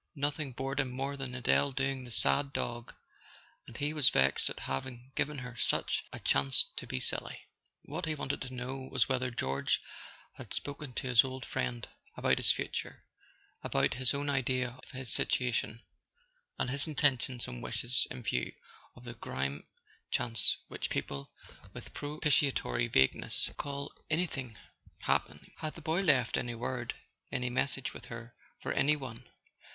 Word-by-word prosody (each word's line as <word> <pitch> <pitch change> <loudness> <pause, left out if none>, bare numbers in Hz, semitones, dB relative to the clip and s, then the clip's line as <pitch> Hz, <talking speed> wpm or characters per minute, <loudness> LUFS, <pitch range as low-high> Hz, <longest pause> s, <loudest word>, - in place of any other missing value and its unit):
Nothing 145 0 -1
bored 135 +2 -2
him 135 -3 +2
more 135 +3 -2
than 135 -2 -4
Adele 130 +2 +3
doing 135 -1 0
the - - -9
"sad 140 +4 +5
dog," 120 -3 -3 0.7
and 120 - -8
he 145 +2 0
was 145 -5 +7
vexed 65 +1 +3
at - - -6
having 120 - -4
given 150 0 0
her 125 -2 -6
such - - +1
a - - -6
chance 70 -1 +4
to - - -4
be 65 - -2
silly. - - -1 0.4
What - - -4
he 155 - 0
wanted 140 -1 -3
to 130 -1 -5
know 130 +2 -5
was 125 -4 +3
whether 130 -1 +1
George 70 - 0 0.6
had - - -6
spoken 145 -2 -5
to 130 - -2
his 125 -3 +7
old 130 -1 -5
friend - - -2 0.3
about - - +3
his - - +7
future—about - - -3
his 130 +2 +2
own 145 +1 -2
idea 130 -2 +1
of - - -14
his 130 -3 -3
situation, 120 -2 +1 0.7
and 125 - -1
his 140 +3 +1
intentions 130 -5 +1
and - - -6
wishes 125 +2 0
in 125 - -7
view 60 - -1 0.4
of 120 - -14
the 120 -1 -6
grim 70 - -3 0.4
chance 115 -3 +4
which - - -4
people, 70 -1 -3 0.4
with - - -9
propitiatory 145 -5 +1
vagueness, 65 - +3
call 140 0 -4 0.2
"any¬ 165 +3 +2
thing 130 - -6 0.4
happening." - - -1
Had 155 -1 -4
the - - -8
boy 160 +4 +1
left 135 -10 +3
any 120 -1 -3
word, 120 +1 -3 0.4
any 125 -2 -1
message 135 0 0
with - - -9
her 115 0 -8 0.3
for - - -3
any 150 +2 +4
one? 125 -4 -8
130 Hz, 160 wpm, -32 LUFS, 120-140 Hz, 0.7 s, was